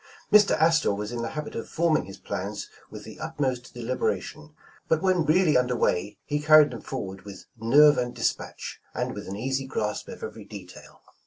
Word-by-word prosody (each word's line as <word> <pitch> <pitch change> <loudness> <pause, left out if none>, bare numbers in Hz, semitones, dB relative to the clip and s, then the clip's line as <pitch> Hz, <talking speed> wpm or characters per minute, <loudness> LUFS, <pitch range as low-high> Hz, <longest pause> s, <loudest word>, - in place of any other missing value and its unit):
Mr. 210 -1 +6
Astor 160 -8 +3
was 105 +2 -5
in 120 -1 -3
the 115 - -3
habit 150 - -4
of 115 - -6
forming 165 -1 +1
his 95 +1 -10
plans - - -5 0.2
with - - -9
the - - -11
utmost 135 -6 -3
delibera 120 +1 0
iton, 150 0 -11 0.3
but 160 +2 +1
when 185 -3 +2
reallj^ 160 0 +4
under 125 0 +2
way, 100 -2 0
he 145 0 -1
carried 150 -1 +6
them 120 -4 -7
for - - -4
ward 95 0 -8
with 100 -1 -11
nerve 140 +6 +5
and 125 0 -3
dispatch, - - -3
and - - -2
with - - -7
an 95 - -5
easy 130 +4 -2
grasp 105 -5 -3
of - - -9
overv 110 -1 -8
detail. 95 -4 -12
130 Hz, 195 wpm, -26 LUFS, 110-155 Hz, 0.3 s, Mr